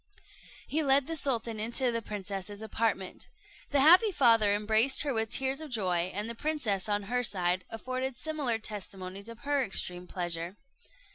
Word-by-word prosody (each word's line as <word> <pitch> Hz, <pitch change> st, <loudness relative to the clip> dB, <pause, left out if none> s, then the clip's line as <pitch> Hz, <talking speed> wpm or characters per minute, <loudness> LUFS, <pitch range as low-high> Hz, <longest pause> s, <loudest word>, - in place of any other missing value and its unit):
He 315 Hz, -, 0 dB
led 275 Hz, -2 st, +3 dB
the 325 Hz, -, -4 dB
sultan 235 Hz, -7 st, 0 dB
into 240 Hz, +3 st, +1 dB
the 230 Hz, 0 st, -2 dB
princess's 205 Hz, 0 st, -5 dB
apartment. 220 Hz, -4 st, -2 dB, 0.4 s
The 285 Hz, -1 st, +3 dB
happy 360 Hz, +9 st, +7 dB
father 230 Hz, -, +4 dB
embraced 220 Hz, +6 st, +3 dB
her 285 Hz, -2 st, -1 dB
with 225 Hz, -1 st, 0 dB
tears 265 Hz, +4 st, 0 dB
of 310 Hz, -, -7 dB
joy; 185 Hz, -6 st, -1 dB
and 205 Hz, +3 st, -3 dB
the 235 Hz, -, -4 dB
princess, 230 Hz, -8 st, -1 dB
on 205 Hz, 0 st, 0 dB
her 245 Hz, +5 st, -1 dB
side, 180 Hz, -4 st, 0 dB
afforded 255 Hz, +3 st, -4 dB
similar 295 Hz, -7 st, -1 dB
testimonies 200 Hz, -1 st, -6 dB
of 230 Hz, -1 st, -11 dB
her 285 Hz, -1 st, +1 dB
extreme 180 Hz, -4 st, -2 dB
pleasure. 175 Hz, +1 st, -3 dB
225 Hz, 160 wpm, -30 LUFS, 200-265 Hz, 0.4 s, happy